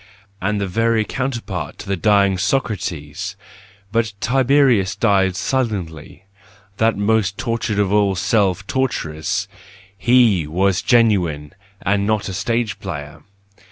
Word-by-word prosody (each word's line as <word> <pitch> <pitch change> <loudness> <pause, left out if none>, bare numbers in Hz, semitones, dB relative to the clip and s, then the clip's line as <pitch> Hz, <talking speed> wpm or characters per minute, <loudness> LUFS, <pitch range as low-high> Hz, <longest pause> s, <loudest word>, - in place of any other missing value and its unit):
And 105 +2 0
the 100 - -1
very 115 +3 +1
counterpart 130 -1 -4
to - - -10
the 100 - 0
dying 100 -1 +3
Socrates!—But 100 - -3
Tiberius 125 -5 +3
died 100 -3 +2
silently, 95 - -3 0.5
that 110 -1 +2
most 100 -1 +1
tortured 115 -2 -2
of 100 -1 +1
all 100 -2 +3
self 100 -1 +1
torturers,— 95 - -2 0.5
he 115 -8 +3
was 95 +4 +1
genuine 95 - +2 0.3
and 100 0 +1
not 110 -2 0
a - - -5
stage 115 +3 -1
player 75 -6 -7
100 Hz, 115 wpm, -20 LUFS, 95-115 Hz, 0.5 s, dying